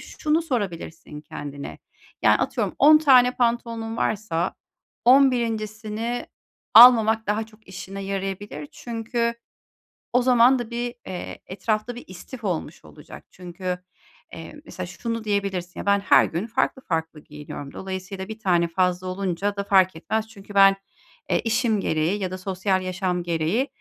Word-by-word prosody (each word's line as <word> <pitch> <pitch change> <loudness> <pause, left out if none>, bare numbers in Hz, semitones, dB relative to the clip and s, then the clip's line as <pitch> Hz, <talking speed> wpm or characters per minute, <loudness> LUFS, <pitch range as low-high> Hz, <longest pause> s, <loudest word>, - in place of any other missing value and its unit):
şunu 310 +2 -1
sorabilirsin 180 - -4
kendine. 145 -1 -8 0.4
Yani, - - +5
atıyorum - - -1
10 305 +2 +8
tane 255 -4 +5
pantolonun 230 -2 -1
varsa 195 -6 -1 0.5
11'incisini 230 -3 +1 0.5
almamak 225 -2 +8
daha 215 +2 -1
çok 220 0 -22
işine 190 +1 -7
yarayabilir. 195 -5 -4
Çünkü 235 0 -3 0.8
o 250 - +4
zaman 250 +1 +5
da 240 -2 -5
bir, 240 0 -4
eee, 185 -1 -6
etrafta 215 +5 -2
bir 245 - -9
istif 225 +7 -11
olmuş 180 -6 -4
olacak. - - -13
Çünkü, 180 0 -5 0.5
eee, 295 - -10
mesela 185 - -7
şunu 230 +5 -4
diyebilirsin: 200 -4 -2
Ya, - - -6
ben 200 0 +3
her 200 - +5
gün 175 +7 -4
farklı 260 +2 -1
farklı 160 -4 -3
giyiniyorum. 150 -2 -9
Dolayısıyla 190 0 -6
bir 220 +1 -8
tane 175 -4 +2
fazla 180 +1 0
olunca 190 +1 -2
da 200 - -2
fark 190 -3 +3
etmez. 220 +7 -2
Çünkü 205 -2 -13
ben, 195 0 +7 0.5
eee, - - +2
işim 225 -1 +1
gereği 165 +3 0
ya 185 -1 -2
da 185 - -4
sosyal 190 0 -1
yaşam 185 -1 -2
gereği, 170 - 0
200 Hz, 140 wpm, -24 LUFS, 180-230 Hz, 0.8 s, 10